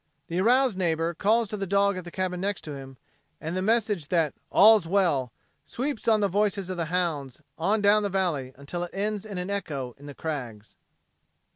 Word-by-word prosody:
The 175 +2 0
aroused 245 -1 +3
neighbor 165 -1 0
calls 220 +6 +2
to 210 - -4
the 195 -1 -3
dog 200 +1 +3
at 185 -1 -6
the - - -6
cabin 180 0 -3
next 200 0 -2
to 150 - -7
him, 135 -1 -9 0.4
and 160 +3 -4
the 185 - 0
message 210 -6 +1
that 165 -4 +1 0.2
"all's 215 -3 +6
well" 165 - +1 0.3
sweeps 260 -2 -4
on 220 -2 +4
the 200 - +3
voices 200 -1 0
of 185 - -4
the 170 - -1
hounds 155 -6 -2 0.2
on 205 +6 +1
down 205 +1 +5
the 205 - -1
valley 170 -9 -1
until 145 +6 -5
it 175 - -8
ends 210 +1 -2
in 200 -3 -6
an 180 +2 -3
echo 140 -11 -3
in 145 - -12
the 145 - -9
crags. 125 -10 -6
185 Hz, 205 wpm, -27 LUFS, 160-205 Hz, 0.4 s, all's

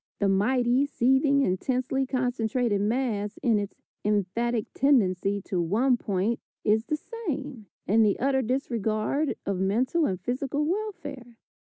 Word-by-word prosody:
The 200 - +1
mighty, 245 +7 +2
seething, 275 +2 +3
intensely 255 +5 0
concentrated 245 -4 0
mass 210 -2 -1
in 230 -5 +3
its 205 -1 -5 0.3
emphatic 210 +3 0
tendency 200 -7 +2
to 180 -3 -1
one 230 +10 +2
point 210 +1 -1 0.2
is 220 +1 +2
the 305 -1 -1
same, 295 - -6 0.2
in 220 +4 +3
the 210 -2 +3
utter 265 0 +2
disregard 240 +2 -1
of 195 -2 -1
mental 250 - +1
and 185 -2 -2
physical 270 +4 -2
welfare. 325 - -4
240 Hz, 130 wpm, -27 LUFS, 205-270 Hz, 0.3 s, seething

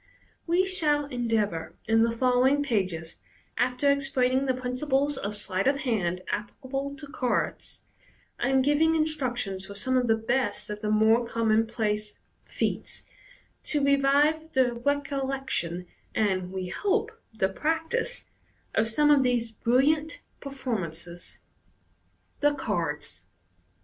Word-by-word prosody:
We 350 +3 +3
shall 300 -6 +1
endeavour 225 - -1
in 225 +1 +3
the 230 0 +3
follow 250 +1 +4
ing 285 +2 +3
pages, 185 - -2 0.4
after 250 +3 +2
explaining 270 -1 +1
the 260 - +2
principles 265 +3 0
of 210 -3 -4
sleight 195 +1 0
of 275 0 +2
hand 185 -8 -1
applicable 270 +6 -4
to 300 0 -9
cards, 275 -4 -2 0.6
and 265 -1 +2
giving 305 +3 +3
instructions 250 -11 -1
for 200 - -9
some 260 +6 -1
of 250 -1 +1
the 225 - +4
best 225 -2 -1
of 210 0 -6
the 210 - -1
more 220 +2 +4
commonplace 220 -2 0 0.3
feats, - - -3 0.6
to 290 -2 0
revive 285 +3 +3
the 255 -3 +3
recollection 270 - -2 0.2
— - - -36
and, 185 -4 0
we 185 -1 -4
hope, 420 - 0 0.2
the 215 -4 +1
practice 325 - -2 0.2
— - - -39
of 220 - +2
some 295 +7 +3
of 285 -2 +6
these 240 -3 +1
biilliant 285 +8 +2 0.2
performances. 185 - -5 1.0
The 290 0 +3
Cards. 165 - -3
250 Hz, 130 wpm, -27 LUFS, 215-285 Hz, 1.0 s, of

